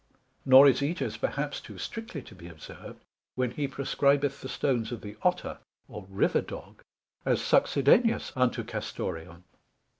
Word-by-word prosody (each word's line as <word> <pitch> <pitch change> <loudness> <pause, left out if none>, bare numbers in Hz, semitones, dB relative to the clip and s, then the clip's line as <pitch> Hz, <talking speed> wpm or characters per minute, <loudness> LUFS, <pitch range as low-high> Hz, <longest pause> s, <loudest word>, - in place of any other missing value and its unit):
Nor 135 +1 +9
is 135 - +4
Ætius 155 +6 -2
perhaps - - -2
too - - -11
strictly 225 - -6
to - - -14
be 85 -3 -12
observed, 80 -3 -11 0.4
when 125 -1 0
he 140 +2 -2
prescribeth 140 +1 +1
the 130 - -7
stones 120 -6 -1
of 120 - -5
the 105 0 -8
Otter, - - 0 0.3
or 105 -3 -9
River 95 - +2
dog, - - -10 0.4
as - - +1
succedaneous 215 - +3
unto 125 -1 +1
Castoreum. 85 0 -6
130 Hz, 145 wpm, -28 LUFS, 105-140 Hz, 0.4 s, Nor